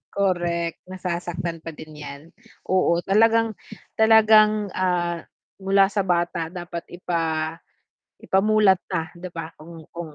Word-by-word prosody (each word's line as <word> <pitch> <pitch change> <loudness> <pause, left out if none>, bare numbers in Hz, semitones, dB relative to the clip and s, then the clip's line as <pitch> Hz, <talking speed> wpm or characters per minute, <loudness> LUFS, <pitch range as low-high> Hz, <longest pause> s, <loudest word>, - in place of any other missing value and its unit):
Correct, 175 -3 -1
nasasaktan 175 -2 -4
pa 160 -1 -9
din 155 +1 -11
yan, 140 -1 -8 0.5
oo 175 -2 +2
talagang 225 +2 +3 0.5
talagang, 215 -2 +5
ah, 175 -2 -1 0.4
mula 195 +1 +3
sa 195 -2 -1
bata 170 -1 0
dapat 175 0 -7
ipa 165 -3 -2 0.7
ipamulat 195 -1 +3
na,' 165 -3 -3
di 185 - -7
ba, 165 -1 -6
kung 165 +1 -12
kung 170 -3 -8
175 Hz, 120 wpm, -23 LUFS, 170-195 Hz, 0.7 s, talagang